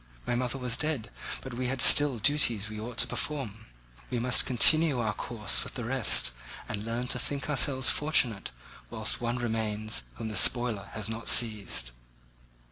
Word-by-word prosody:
My - - -2
mother 125 +1 -2
was 125 -2 0
dead, 140 -9 -3 0.3
but 130 - -9
we 125 +1 -4
had 130 +1 -4
still 145 0 +6
duties 120 -3 +1
which 110 0 -8
we - - -7
ought 120 0 -9
to - - +5
perform; 115 -8 -4 0.4
we 125 - -3
must 125 +1 +2
continue 150 +3 +4
our 110 -2 -2
course 110 0 -2
with - - -9
the 120 - -5
rest 120 - +1 0.4
and 105 -1 -5
learn 115 +2 -4
to 125 - +1
think 140 +2 -4
ourselves 135 -2 +3
fortunate 125 -9 +1 0.4
whilst - - -1
one 120 +1 -2
remains 110 - -3
whom 110 - -7
the 105 - -7
spoiler 115 -4 +3
has 110 -2 -2
not 110 +1 -6
seized. 105 - +2
120 Hz, 175 wpm, -28 LUFS, 110-130 Hz, 0.4 s, still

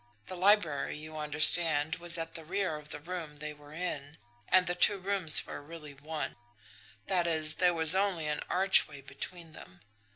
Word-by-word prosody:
The 185 - -7
library, 180 -7 +1
you 155 +1 -9
understand, 155 +1 +3
was 170 0 -3
at 165 0 -5
the 165 - -8
rear 185 0 -3
of 150 0 -10
the - - -4
room 165 -1 -8
they 150 +1 -6
were 145 0 -18
in, 155 -3 -6 0.3
and 185 0 +4
the 175 - -1
two 200 +3 +4
rooms 190 -4 +6
were - - -9
really 150 -1 -10
one; 150 +2 -7 0.7
that 175 -2 0
is, 155 -1 -1
there 180 -1 +3
was 160 +1 +2
only 190 -4 -1
an 150 0 -3
archway 180 -6 +2
between 160 +4 -9
them. 90 -10 -15
160 Hz, 175 wpm, -29 LUFS, 150-180 Hz, 0.7 s, rooms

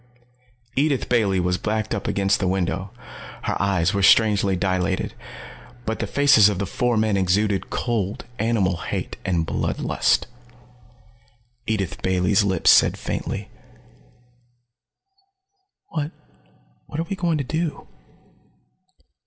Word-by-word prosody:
Edith 140 -1 +1
Bailey 105 -6 +2
was 90 0 0
backed 110 0 -2
up - - -3
against 100 0 +1
the 95 - 0
window. 95 0 -1 0.5
Her - - -1
eyes 95 -2 +1
were 100 - 0
strangely 100 -1 +4
dilated. 95 0 -1 0.7
But 110 - -2
the - - -2
faces 140 -8 +5
of 100 - -2
the 100 - -2
four 120 +3 0
men 110 -1 +2
exuded 95 +1 +1
cold 110 -4 -2
animal 105 -5 +1
hate, - - -4
and 85 -3 0
blood - - -2
lust. - - +1 1.4
Edith 100 -4 -2
Bailey's 95 +2 +2
lips 95 -2 +3
said - - +5
faintly, - - -4 2.4
"What 150 -1 -3 0.8
what 150 - -6
are - - +1
we 195 - -3
going 170 -4 0
to 145 - -2
do?" 160 +3 -3
100 Hz, 120 wpm, -23 LUFS, 95-115 Hz, 2.4 s, faces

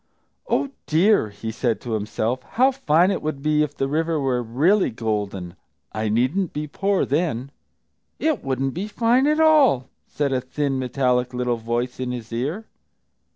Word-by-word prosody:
"Oh, 280 - 0 0.2
dear!" 170 - +3
he 105 +2 -6
said 115 -2 -1
to 120 - -6
himself, 110 +4 -1 0.2
"how 260 +2 +5
fine 185 - +3
it - - -2
would 150 -3 -4
be 150 0 +2
if 150 -1 -2
the 135 - 0
river 160 +2 0
were 130 -3 0
really 150 - +2
golden! 105 -6 -3 0.4
I 110 +1 -2
needn't 130 - +1
be 150 +1 -3
poor, 195 +6 0
then." 140 -4 -1 0.7
"It 310 -7 0
wouldn't 135 0 -1
be 190 +5 -4
fine 235 +5 +2
at 305 +1 +2
all!" 295 - +4 0.2
said 140 -2 -1
a 130 - 0
thin, 135 +1 -2
metallic 125 -1 0
little 125 -1 0
voice, 120 +3 -3
in 125 -1 -2
his 120 -2 -6
ear. 150 - -3
135 Hz, 165 wpm, -23 LUFS, 120-175 Hz, 0.7 s, how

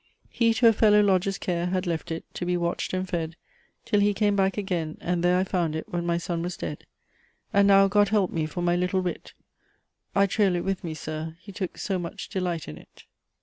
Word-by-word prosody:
He 230 -1 +3
to 235 - +5
a 225 - +7
Fellow 210 -1 +5
lodger's 195 -1 +2
care 175 -1 -1
Had 185 +1 -1
left 170 -1 -3
it, 165 0 -4
to - - -5
be 180 0 0
watched 170 0 -2
and 185 0 -2
fed, 165 -2 -3 0.5
Till 220 -3 +2
he 205 0 +3
came 205 0 +2
back 195 0 +1
again; 175 -6 -2
and 175 0 -1
there 180 +1 +4
I 185 - +2
found 175 -5 -1
it 160 - -4
when 175 0 -3
my 170 0 +1
Son 170 0 -3
was 175 +1 -4
dead; - - -6 0.7
And 200 0 +5
now, 195 0 +6
God 205 0 +3
help 205 -3 +2
me 160 -2 -1
for 175 +3 -4
my 175 0 +2
little 180 +1 +1
wit! 180 -2 -5 0.8
I 200 - +5
trail 195 -2 +2
it 175 - -2
with 195 0 -2
me, 160 -2 -4
Sir! 155 +1 -6
he 200 - -11
took 185 -1 -5
so 190 -3 -2
much 170 -1 -6
delight 180 -4 -2
in 75 - -8
it." - - -18
180 Hz, 230 wpm, -26 LUFS, 170-195 Hz, 0.8 s, a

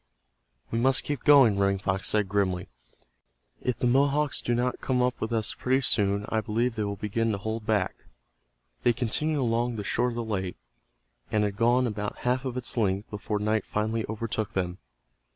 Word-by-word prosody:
"We 115 - 0
must 130 +2 +3
keep 145 -4 -3
going," 130 -9 +6
Running 100 0 +2
Fox 95 0 -2
said, 105 -2 +1
grimly. 95 -2 0 0.9
"If 125 -3 -1
the - - -1
Mohawks 140 +3 +3
do 120 - 0
not 125 +1 -1
come 130 -1 0
up 125 0 -1
with 110 - -2
us 110 -2 0
pretty 130 +1 +1
soon 100 -4 +1
I 110 - +1
believe 115 +2 0
they 110 - -1
will 100 0 -2
begin 110 +3 -1
to - - -1
hold 110 +2 -4
back." 105 -4 0 0.8
They 120 - +3
continued 145 +6 -1
along 120 0 0
the 105 - -4
shore 125 +4 +1
of 120 - -6
the 120 - -2
lake, 95 -5 -3 0.7
and 105 -1 +2
had 100 -1 -1
gone 120 +3 +3
about 105 -3 -3
half 125 +2 +1
of 130 -1 -3
its 125 -2 -2
length 100 -2 0
before 105 0 -2
night 110 0 0
finally 110 +1 -1
overtook 110 -1 -3
them. 90 -1 -2
110 Hz, 190 wpm, -27 LUFS, 105-125 Hz, 0.9 s, going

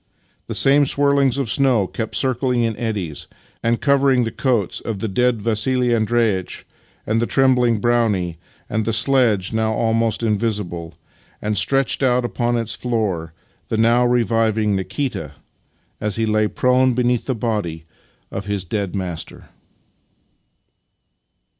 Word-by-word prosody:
The - - -4
same 140 +1 +4
swirls 140 -2 +2
of 135 -3 -1
snow 130 -7 +3
kept 100 +5 -5
circling 125 -2 +1
in 115 -1 -1
eddies 100 - -4 0.3
and 115 0 +1
covering 140 -3 +3
the 115 - -2
coats 120 -9 0
of 115 -3 -4
the 110 - -3
dead 120 +1 0
Vassili 120 +2 +1
Andreitch 110 -4 0 0.4
and 115 +1 0
the 120 - 0
trembling 125 -3 +3
Brownie, 105 -8 0 0.3
the 110 +1 -1
sledge 115 -5 +2
(now 110 0 0
almost 115 0 0
invisible) 105 -7 -2 0.4
and, 105 0 -2
stretched 135 +8 +1
out 125 -2 +2
upon 120 0 -1
its 115 -1 -3
floor, 100 -10 -2 0.3
the 110 - -2
now 115 +2 +4
reviving 115 -3 +1
Nikita 95 - -3 0.7
as 105 -2 -2
he 115 - 0
lay 110 0 +2
prone 125 +4 +2
beneath 125 -1 0
the 130 - 0
body 105 -8 -3 0.5
of 100 +1 -5
his 100 -2 -2
dead 100 +1 -3
master. 90 -4 -6
115 Hz, 135 wpm, -20 LUFS, 105-125 Hz, 0.7 s, same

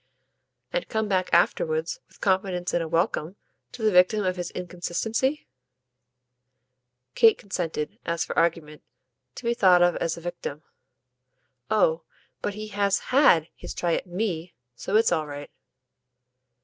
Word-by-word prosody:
"And - - -2
come 220 -1 -1
back 185 -2 0
afterwards, 475 0 +1
with - - -24
confidence 185 -2 0
in 175 - +2
a 165 - -3
welcome, 170 +1 -1 0.4
to 230 - -8
the 215 - +4
victim 185 +3 +4
of 185 0 0
his 175 -1 -4
inconstancy?" 185 - -2 1.7
Kate 225 -1 +5
consented, 165 -6 -4
as 170 0 -1
for - - -5
argument, 165 -3 0 0.5
to - - -9
be 235 0 +1
thought 185 -6 +5
of 175 0 +3
as 165 0 -2
a - - -9
victim. 170 -3 -6 1.1
"Oh 165 -6 +2 0.4
but 205 - -3
he 215 0 -6
has 200 -1 0
HAD 215 - +5
his - - -8
try 170 -1 0
at - - -2
ME. 175 -3 -3 0.2
So 195 - -3
it's 220 +1 +4
all 155 -1 0
right." 145 0 -8
180 Hz, 145 wpm, -25 LUFS, 170-215 Hz, 1.7 s, Kate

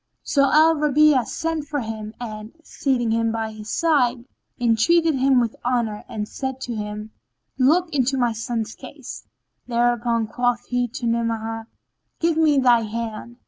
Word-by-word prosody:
So 275 -1 +2
Al 320 +1 +5
Rabi'a 295 -3 +4
sent 325 -2 -3
for 290 -1 -2
him 220 -1 -6
and, 215 -2 -7
seating 250 -7 -1
him 230 0 +1
by 225 -1 -3
his 215 0 -9
side, 255 -7 +1 0.3
entreated 275 +9 +3
him 265 -1 +3
with 230 -2 -1
honour 235 -4 -1
and 210 -1 -4
said 265 +1 -5
to 240 - -4
him, 210 0 -5 0.5
"Look 325 +6 +3
into 270 -1 +1
my 240 -2 +1
son's 225 0 -3
case." - - -10 0.4
Thereupon 235 -1 +1
quoth 245 +2 -1
he 245 0 0
to 240 +1 -6
Ni'amah, 225 -1 -2 0.5
"Give 330 -1 +2
me 310 -3 +3
thy 245 -3 +5
hand." 230 +1 -5
240 Hz, 150 wpm, -22 LUFS, 225-275 Hz, 0.5 s, Al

